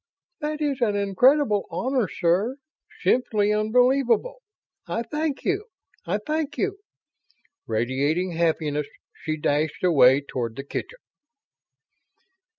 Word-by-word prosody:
"That 305 Hz, 0 st, -3 dB
is 280 Hz, -4 st, -1 dB
an 210 Hz, -4 st, +2 dB
incredible 210 Hz, +3 st, +3 dB
honor, 245 Hz, +6 st, 0 dB
sir. 185 Hz, +9 st, 0 dB, 0.5 s
Simply 210 Hz, -4 st, +2 dB
unbelievable. 250 Hz, -, +2 dB, 0.5 s
I 230 Hz, -, -2 dB
thank 300 Hz, +1 st, -3 dB
you! 395 Hz, +2 st, 0 dB, 0.4 s
I 190 Hz, +4 st, +1 dB
thank 300 Hz, +6 st, -3 dB
you!" 400 Hz, 0 st, -1 dB, 0.9 s
Radiating 135 Hz, +10 st, 0 dB
happiness, 155 Hz, -3 st, 0 dB, 0.3 s
she 155 Hz, 0 st, -4 dB
dashed 150 Hz, +2 st, -1 dB
away 140 Hz, -6 st, +5 dB
toward 120 Hz, -5 st, -4 dB
the 135 Hz, -, -6 dB
kitchen. 470 Hz, -, -6 dB
210 Hz, 105 wpm, -24 LUFS, -, 0.9 s, away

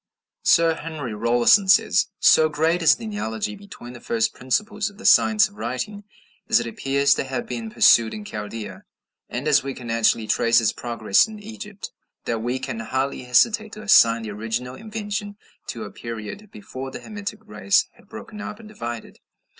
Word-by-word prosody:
Sir 165 Hz, -1 st, +4 dB
Henry 155 Hz, -7 st, -6 dB
Rawlinson 120 Hz, -, +3 dB
says: 195 Hz, -, +4 dB
"So 155 Hz, 0 st, +5 dB
great 160 Hz, +3 st, +1 dB
is 160 Hz, -1 st, +6 dB
the 230 Hz, -, -9 dB
analogy 205 Hz, -, -4 dB
between 200 Hz, -12 st, -11 dB
the 120 Hz, -, -12 dB
first 115 Hz, -2 st, 0 dB
principles 210 Hz, -, -1 dB
of 200 Hz, -, -19 dB
the 230 Hz, -, -12 dB
Science 110 Hz, -3 st, +5 dB
of 100 Hz, -, -20 dB
writing, 130 Hz, -, -5 dB, 0.4 s
as -, -, +5 dB
it 120 Hz, -, -4 dB
appears 140 Hz, +4 st, +1 dB
to -, -, -2 dB
have 130 Hz, -2 st, -4 dB
been 115 Hz, -2 st, -5 dB
pursued 115 Hz, +1 st, +5 dB
in 210 Hz, -, -7 dB
Chaldea, 105 Hz, -, -7 dB, 0.5 s
and 125 Hz, +5 st, -4 dB
as 150 Hz, -, +4 dB
we 135 Hz, 0 st, -5 dB
can 120 Hz, -2 st, -7 dB
actually 115 Hz, -1 st, +2 dB
trace 115 Hz, +2 st, +3 dB
its 115 Hz, -, +1 dB
progress 115 Hz, -, +1 dB
in 220 Hz, -1 st, -10 dB
Egypt, 210 Hz, -1 st, -9 dB, 0.3 s
that 115 Hz, -1 st, -2 dB
we 120 Hz, +3 st, -2 dB
can 130 Hz, -3 st, -5 dB
hardly 130 Hz, +3 st, -3 dB
hesitate 215 Hz, -, +2 dB
to 215 Hz, -, -9 dB
assign 115 Hz, -, +5 dB
the 110 Hz, -, -5 dB
original 115 Hz, +4 st, -4 dB
invention 210 Hz, +1 st, -5 dB, 0.3 s
to 115 Hz, -, -5 dB
a 105 Hz, -, -8 dB
period 115 Hz, -, -8 dB
before 165 Hz, -12 st, -8 dB
the -, -, -8 dB
Hamitic 210 Hz, 0 st, -7 dB
race 205 Hz, -1 st, +1 dB
had 200 Hz, -, -24 dB
broken 220 Hz, -1 st, -9 dB
up 210 Hz, -, -7 dB
and 225 Hz, -, -12 dB
divided." 120 Hz, -, -7 dB
135 Hz, 180 wpm, -23 LUFS, -, 0.5 s, is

